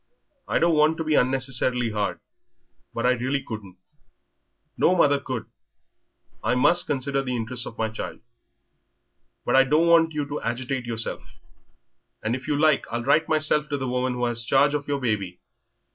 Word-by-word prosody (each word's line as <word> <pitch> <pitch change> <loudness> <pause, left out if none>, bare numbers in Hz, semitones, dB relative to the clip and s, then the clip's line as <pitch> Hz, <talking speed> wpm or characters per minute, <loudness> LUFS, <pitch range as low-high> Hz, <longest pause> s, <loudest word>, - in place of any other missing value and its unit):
I - - +1
don't 170 0 +3
want 155 +1 +3
to 160 - -2
be 155 -1 0
unnecessarily 125 -3 +1
hard 100 -4 -2 0.7
but 115 - -3
I 125 - +5
really 130 +2 -1
couldn't 105 -7 -8 1.0
no 185 - +3
mother 145 -5 +3
could. 130 -5 -5 1.0
I 115 +4 +1
must 170 +8 +3
consider 135 0 -1
the 125 -2 -3
interests 120 +1 -2
of 115 - -10
my 110 - 0
child. 110 +1 -7 1.3
But - - +1
I 135 - +7
don't 150 +5 +2
want 165 -1 +4
you 150 -1 -1
to 145 +1 -5
agitate 125 +2 -3
yourself, 115 -1 -3 0.9
and 110 +2 0
if 130 - -8
you 150 - 0
like 155 -2 +3
I'll 120 0 -2
write 145 +5 +2
myself 155 -1 +1
to 145 - -1
the 130 -1 -4
woman 125 0 -1
who 125 0 -1
has 120 -1 +1
charge 140 +4 +3
of 145 -1 -3
your 145 -1 -1
baby. 105 -8 -2
130 Hz, 175 wpm, -24 LUFS, 120-145 Hz, 1.3 s, I